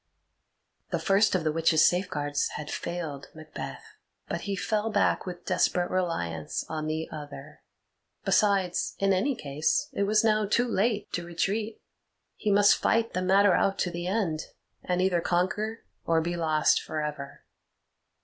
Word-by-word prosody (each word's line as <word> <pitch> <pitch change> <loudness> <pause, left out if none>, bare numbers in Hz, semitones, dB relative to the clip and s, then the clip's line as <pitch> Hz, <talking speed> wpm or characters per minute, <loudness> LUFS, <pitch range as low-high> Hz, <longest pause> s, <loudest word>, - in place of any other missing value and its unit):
The - - 0
first 200 0 +3
of 180 - 0
the 155 - +1
witches' 160 0 +4
safeguards 145 -5 0
had 150 0 -6
failed 160 -5 -5
Macbeth, 150 - -8 0.4
but - - -3
he 200 - -3
fell 215 +3 -1
back 205 -2 +1
with 175 -1 -7
desperate 175 -1 +1
reliance 85 - -2
on 155 -1 -4
the 160 +1 -2
other. 145 -1 -9 0.6
Besides, 195 -4 +2
in 195 0 +2
any 260 +9 +1
case, 145 -4 -1
it 200 - 0
was 215 +2 +3
now 215 -2 +2
too 240 +4 +2
late 215 -1 0
to 175 - -2
retreat; 205 +6 -2 0.5
he 215 - -2
must 205 0 +5
fight 230 0 +1
the 185 - -1
matter 195 +1 +4
out 195 +2 +2
to 180 - -1
the 175 +1 -4
end, 185 -6 0 0.4
and 180 0 0
either 180 -2 +2
conquer 200 +6 -1 0.2
or 165 -1 +2
be 170 +2 -2
lost 155 -2 +2
for 155 -1 -4
ever. 145 -2 -6
180 Hz, 155 wpm, -27 LUFS, 155-200 Hz, 0.6 s, must